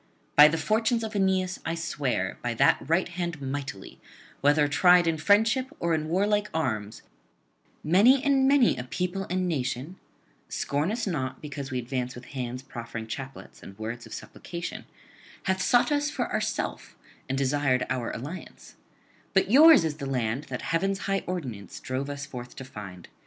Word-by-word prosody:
By 150 +1 +10
the 160 +2 0
fortunes 220 +8 +1
of 220 -1 -5
Aeneas 190 -1 +1
I 165 - -2
swear, 140 - -2
by 120 -1 -2
that - - +4
right 170 +3 +2
hand 175 -2 -4
mighty, 135 -7 -6 0.4
whether 145 +2 +4
tried 175 +4 +5
in 165 -1 +1
friendship 220 +8 +3
or 170 -1 +1
in 155 -1 -1
warlike 205 +4 +1
arms, 110 -8 -2 0.8
many 225 - +5
and 275 -2 +3
many 275 -3 +4
a 125 - -4
people 180 +9 -3
and 185 0 0
nation 135 +2 -3 0.5
scorn 145 +6 -1
us 240 +2 -2
not 140 -9 -3
because 145 -2 -6
we 130 - -3
advance 125 0 -3
with 125 +1 -10
hands 125 -1 -4
proffering 115 -3 -7
chaplets 110 - -8
and 95 - -12
words 115 +2 -6
of - - -10
supplication 170 -1 -7 0.6
hath 190 -1 0
sought 245 +9 +3
us 290 0 +1
for - - -2
itself - - -3 0.3
and 135 - -1
desired 135 -1 +1
our 130 -2 -2
alliance; 150 +10 -8 0.6
but 190 +1 +3
yours 300 - +8
is 155 -2 -2
the 140 - -5
land 125 +1 -1
that - - -6
heaven's 195 +4 0
high 195 0 -1
ordinance 130 - -5
drove 130 +2 -3
us 145 0 -5
forth 125 -3 -9
to 130 - -8
find. 100 -7 -9
150 Hz, 165 wpm, -27 LUFS, 130-190 Hz, 0.8 s, By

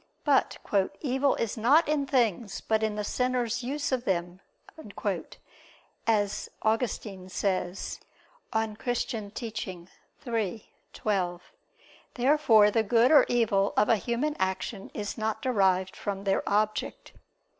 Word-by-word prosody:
But 285 -3 +2 0.4
"evil 270 0 +1
is 230 0 -2
not 275 +9 +4
in 295 -2 0
things, 230 -6 +1
but 220 0 0
in 215 -1 0
the 210 - -2
sinner's 245 +1 0
use 280 +4 -2
of 255 -2 0
them," 180 -1 -2 1.7
as 205 -3 +1
Augustine 215 -4 -1
says 185 -1 -2 0.5
(De 220 - 0
Doctr. 220 0 -3
Christ. 185 - -11
iii, 220 -3 -2 0.3
12). 180 -4 -1 0.7
Therefore 245 -6 +5
the 225 - +3
good 230 +4 +3
or 300 - +7
evil 205 -5 +2
of 210 - +4
a 225 - +5
human 245 +8 -1
action 190 +2 -2
is 210 +2 -4
not 220 0 -1
derived 190 -6 +2
from 200 -1 -4
their 195 -1 +1
object. 215 +1 -1
220 Hz, 125 wpm, -28 LUFS, 200-245 Hz, 1.7 s, or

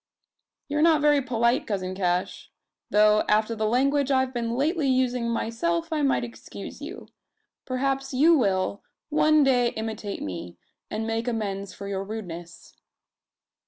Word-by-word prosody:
"You're 295 +1 0
not 320 -1 +5
very 295 -1 +4
polite, 235 -1 +1
cousin 185 -3 -2
Cash; 180 -1 -2 0.4
though, 210 0 +5
after 215 +2 +2
the 215 0 0
language 275 +4 +2
I've 260 -1 +1
been 235 -1 -2
lately 300 +3 +1
using 250 -2 +1
myself, 330 +9 -1
I 305 - 0
might 275 -3 +2
excuse 235 -1 -9
you. - - -8 0.6
Perhaps 270 +1 -1
you 305 +6 +5
will, 200 -6 0 0.3
one 310 0 +4
day 250 -3 +3
imitate 220 -2 -4
me, 90 -2 -6 0.3
and 220 +1 -3
make 225 +1 -2
amends 200 -5 -3
for 200 - -7
your 195 -1 -3
rudeness." 175 -5 -8
235 Hz, 140 wpm, -26 LUFS, 210-275 Hz, 0.6 s, not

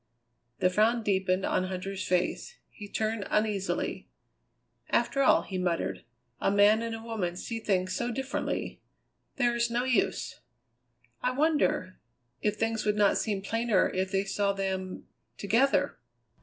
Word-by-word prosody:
The 185 0 +2
frown 225 +4 +3
deepened 190 -2 +1
on 185 - +1
Huntter's 190 +1 -4
face; 180 - -1
he 205 -2 -10
turned 220 -1 -2
uneasily. 210 -2 -1 0.8
"After 240 +4 +1
all," 270 - +5
he 185 -2 -4
muttered, 175 -7 -1 0.3
"a - - +2
man 205 +2 +5
and 225 -1 -4
woman 210 -7 -3
see 225 +5 -4
things 185 -4 0
so 240 - -1
differently. 265 +2 -3 0.5
There 240 -2 +2
is 235 0 +1
no 240 +1 0
use!" 195 - 0 0.8
"I 250 - +1
wonder 280 - +1 0.4
if 210 0 +1
things 225 +1 -1
would 210 0 +1
not 205 -1 +4
seem 200 -3 -2
plainer 225 -1 +2
if 185 0 -1
they 195 0 +1
saw 200 0 0
them 190 -1 -3 0.3
together?" 230 - +2
205 Hz, 140 wpm, -29 LUFS, 190-230 Hz, 0.8 s, all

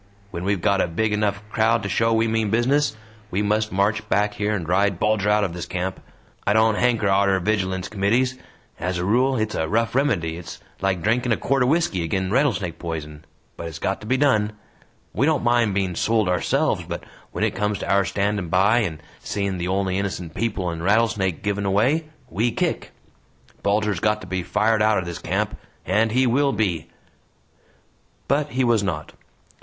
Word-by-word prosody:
When 85 - -5
we've 100 -3 0
got 100 -1 +3
a - - +1
big 105 +6 -1
enough 105 0 -1
crowd 115 0 +2
to - - -2
show 115 +3 +2
we 115 0 +2
mean 110 -1 0
business, 120 +2 +1 0.3
we 100 +2 -1
must 110 +1 0
march 100 +3 0
back 105 +1 +2
here 105 +1 -1
and 85 -6 -4
ride 100 +1 +2
Bulger 105 +1 +1
out 105 0 +3
of 95 -4 -2
this 85 0 -6
camp! 95 +1 -3 0.4
I 100 - +2
don't 110 0 +4
hanker 115 -2 +1
arter 95 0 +3
Vigilance 95 -2 -1
Committees, 115 +6 +1 0.4
as 90 +1 -2
a 90 - -2
rule 130 +6 +2
it's 110 -1 -1
a 80 - -1
rough 115 +1 +1
remedy 95 - 0
it's 85 - -9 0.2
like 95 -3 0
drinkin' 120 +3 +1
a 110 - +3
quart 135 0 0
o' 125 - +3
whisky 140 - +1
agin 95 +3 -1
rattlesnake 100 - 0
poison 75 -3 -6 0.3
but 85 - -6
it's 80 -2 -7
got 95 +4 -2
to 105 - -9
be 130 +3 +2
done! 110 -7 +2 0.6
We 135 +6 +2
don't 155 -2 +1
mind 120 -4 +2
being 95 -2 0
sold 110 +2 +1
ourselves 90 -1 +1
but - - -5 0.3
when - - -2
it - - +1
comes 105 0 -1
to - - -6
our 100 0 +3
standin' 100 -1 -1
by 100 +7 +4
and 85 -8 -3 0.2
seein' 100 -2 -3
the 85 - -2
only 95 0 0
innocent 90 -4 -4
people 100 -5 -2
in 85 0 -6
Rattlesnake 100 -3 +1
given 105 0 -1
away 125 +12 +2 0.2
we 115 +1 0
kick! - - -2 0.7
Bulger's 105 -2 +1
got 105 +2 +1
to - - -9
be 95 0 -2
fired 105 +4 +1
outer 105 -4 +2
this 85 -2 -5
camp! - - -2 0.3
And 110 +5 +2
he 130 +3 +3
will 140 +3 +2
be!" 95 -7 -1 1.4
But 145 +2 +1
he 130 0 0
was 120 -3 +3
not. 80 -6 -4
105 Hz, 190 wpm, -23 LUFS, 95-115 Hz, 1.4 s, don't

